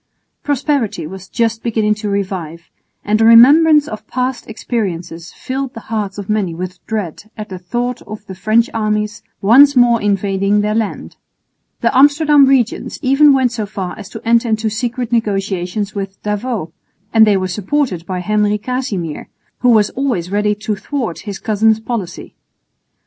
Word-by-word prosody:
Prosperity 275 - -1
was 190 +3 -9
just 225 -1 -1
beginning 215 -2 +1
to 210 0 -5
revive, 180 -5 -4 0.3
and 215 +1 +1
a - - +5
remembrance 290 +7 +7
of 215 -3 -8
past 255 -1 -3
experiences 180 -7 -4
filled 265 0 -5
the - - -6
hearts 205 -3 -2
of 200 -2 -6
many 205 -6 -1
with 180 +1 -7
dread 210 -1 -4
at 215 0 -7
the 185 -2 -7
thought 240 +7 -3
of 215 0 -9
the 190 - -8
French 215 +5 +2
armies 215 0 -1 0.2
once 275 +7 +6
more 240 -2 +4
invading 200 0 +1
their 210 +1 0
land. 220 -2 -3 0.6
The - - +1
Amsterdam 290 +1 +5
regents 255 -4 0
even 275 +3 +5
went 260 -3 +2
so 220 -4 -4
far 190 -3 -5
as 190 - -10
to - - -9
enter 235 +1 +3
into 220 0 0
secret 245 +1 -3
negotiations 200 -3 -1
with 195 -1 -6
D'Avaux; 210 -4 -3 0.4
and 220 -1 +6
they 205 -2 +4
were 185 0 -1
supported 200 - -2
by 185 -1 -3
Henry 210 +1 +1
Casimir, 210 - -4 0.3
who 250 - +2
was 215 -3 +4
always 235 -10 -2
ready 210 +1 +1
to 210 +1 -3
thwart 230 - -4
his 200 - -5
cousin's 220 +1 +1
policy. 220 -5 -5
215 Hz, 160 wpm, -16 LUFS, 195-245 Hz, 0.6 s, remembrance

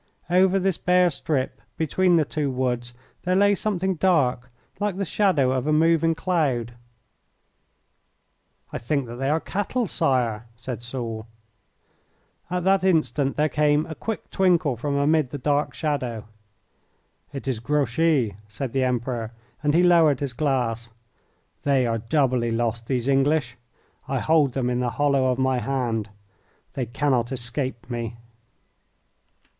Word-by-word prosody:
Over 185 +1 +4
this 190 -2 0
bare 180 -1 +3
strip 140 -2 -2 0.2
between 175 +3 +2
the 160 -2 +3
two 145 0 -2
woods 125 -2 -2 0.3
there 180 +1 0
lay 205 +1 +5
something 190 -2 -1
dark, 140 -8 +1 0.3
like 205 -2 -1
the 195 - -1
shadow 165 -10 +2
of 130 +1 -1
a - - +2
moving 165 +1 +3
cloud. 145 -10 0 2.0
"I - - -3
think 140 +3 -1
that 120 0 -8
they 135 +2 -1
are 155 +2 +2
cattle, 205 +8 -2
Sire," 120 -9 0
said 120 +1 -6
Soult. 120 -2 -5 1.2
At 180 0 -2
that 190 0 +3
instant 155 -6 +1
there 150 +1 +2
came 150 0 +2
a 160 - -6
quick 225 +7 -5
twinkle 175 -8 +2
from 140 +5 -2
amid 145 0 +2
the 145 - -5
dark 145 +2 0
shadow. 125 -8 -2 1.1
"It 135 -1 -7
is 125 -5 -1
Grouchy," 135 - +1
said 115 +4 -5
the 135 -1 +1
Emperor, 120 -2 -2 0.3
and 150 0 +1
he 175 - +5
lowered 165 -6 +5
his 140 -3 -3
glass. 120 -4 -1 0.7
"They 135 -3 +2
are 115 -1 0
doubly 125 0 +1
lost, 115 0 -1
these 125 -2 -1
English. 135 -2 +2 0.5
I 135 - -1
hold 145 0 +2
them 130 -2 -1
in 125 0 0
the 125 -1 0
hollow 140 -2 +2
of 125 -1 +1
my 130 -1 +1
hand. 120 -5 -2 0.6
They 130 -3 -3
cannot 125 0 0
escape 125 0 -3
me." 120 -1 -4
135 Hz, 145 wpm, -24 LUFS, 120-160 Hz, 2.0 s, lay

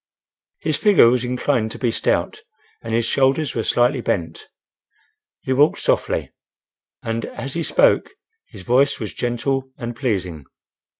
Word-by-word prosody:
His 155 -2 -2
figure 200 - +5
was 125 0 0
inclined 125 -2 0
to - - -8
be 120 -3 0
stout, - - -1 0.4
and 115 - -7
his 115 0 +1
shoulders 135 +4 +1
were 115 - -2
slightly 125 +3 +2
bent. 85 -7 -3 0.9
He 130 - -1
walked 145 +4 +3
softly, - - -1 0.7
and 115 0 -3
as 135 - -7
he 170 - -2
spoke - - +3 0.4
his 100 -5 -12
voice 135 +6 +2
was 110 -3 -5
gentle 130 +2 -2
and 120 0 -6
pleasing. 95 - -3
120 Hz, 140 wpm, -21 LUFS, 115-135 Hz, 0.9 s, figure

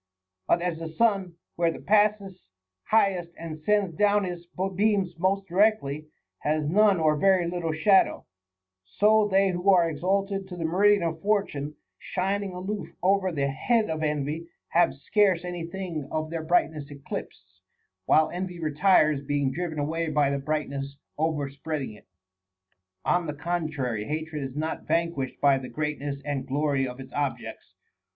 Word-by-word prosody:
But 170 - +2
as 175 -2 -2
the 165 -1 -5
sun, 195 -1 +1 0.2
where 170 -1 +2
he - - -7
passes 205 - +1 0.4
highest 185 -6 +1
and 160 -2 -7
sends 200 -1 +1
down 205 +2 +3
his 175 -2 -5 0.3
beams 200 -3 +2
most 195 +2 +1
directly, 175 -6 +1 0.3
has 155 0 0
none 200 +2 +4
or 155 -1 +3
very 185 +2 +3
little 170 -2 -2
shadow, 190 +5 +3 0.6
so 210 - +3
they 195 0 +3
who 180 +2 0
are 180 -3 +6
exalted 195 +4 -1
to 180 - -8
the 165 - -2
meri 200 +5 +4
dian 185 - -4
of 165 -1 -2
fortune, 160 -8 -1 0.2
shining 195 +1 -2
aloof 190 -1 -4
over 190 0 +3
the 140 -4 -1
head 185 - +1
of 160 0 -3
envy, 150 +2 -2 0.2
have 170 -5 +3
scarce 180 +5 +2
any 175 -2 -4
thing 170 -5 -5
of 155 0 -3
their 165 -1 -3
brightness 155 -3 +1
eclipsed, 95 -9 -8 0.5
while 155 - +4
envy 180 0 -5
retires, 155 -2 +3
being 140 -1 0
driven 160 +2 -4
away 160 +3 -1
by 145 -2 +2
the 140 - -1
brightness 140 -1 -3 0.2
overspread 150 -1 -2
ing 110 - -6
it. 105 - -17 1.0
On 175 -1 +1
the 150 - -4
contrary, 145 -9 -2
hatred 155 +2 -4
is 135 -1 -5
not 155 +2 -3
vanquished 165 -5 -1
by 140 -2 +4
the 130 - -8
great 150 -1 -3
ness 140 0 -4
and 140 -2 -3
glory 140 -1 0
of 125 +1 -8
its 130 -1 -10
objects. 135 -5 -4
165 Hz, 160 wpm, -26 LUFS, 145-190 Hz, 1.0 s, are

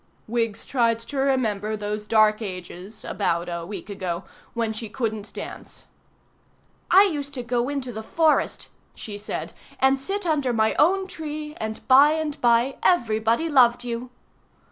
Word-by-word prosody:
Wiggs 230 -2 -2
tried 235 -3 +2
to 275 +5 -6
remember 220 -6 0
those 210 0 -4
dark 215 0 +4
ages 185 +1 -7
(about 170 -4 -1
a 170 -1 -4
week 195 -3 -7
ago) 185 -3 -4 0.3
when 230 -2 -1
she 220 0 -6
couldn't 220 -2 -3
dance. - - -8 1.0
"I 390 - +8
used 290 -7 -2
to 250 - -4
go 240 +1 0
into 270 -4 -3
the 220 - -5
forest," 315 +7 +1 0.3
she 210 - -7
said, 210 - -5 0.3
"and 265 +1 +4
sit 390 +7 -3
under 285 -7 +1
my 220 -1 +2
own 380 +5 +4
tree, 305 -4 -6
and 220 0 -5
by 280 +3 +7
and 315 -2 -3
by 240 +2 +3
everybody 230 -2 +2
loved 245 -5 +4
you." 240 +1 -4
235 Hz, 150 wpm, -24 LUFS, 215-280 Hz, 1.0 s, I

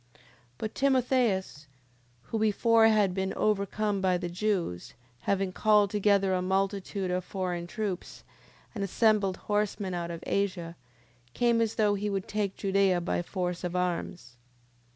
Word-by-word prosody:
10:24. - - -26 0.4
But 215 - -4
Timotheus, 250 - +1 0.6
who 225 - -3
before 225 +1 +4
had 210 -4 +3
been 190 0 -2
overcome 205 0 0
by 185 -1 +2
the 175 -1 -4
Jews, 180 - -2 0.2
having 195 +5 0
called 210 0 +3
together 200 -2 +2
a 180 - +1
multitude 195 0 -1
of 180 0 -1
foreign 180 -2 -3
troops, 190 +1 -5 0.5
and 205 -4 -3
assembled 200 -1 +2
horsemen 205 -2 -1
out 170 -1 -3
of 170 0 -7
Asia, 180 -4 -1 0.6
came 235 -1 +3
as 225 -1 0
though 210 -2 +3
he 205 +1 -2
would 195 -2 -3
take 205 -2 -2
Judea 195 -2 +2
by 175 0 -1
force 180 0 -3
of 180 0 -3
arms. 175 -7 -3
195 Hz, 145 wpm, -29 LUFS, 180-210 Hz, 0.6 s, before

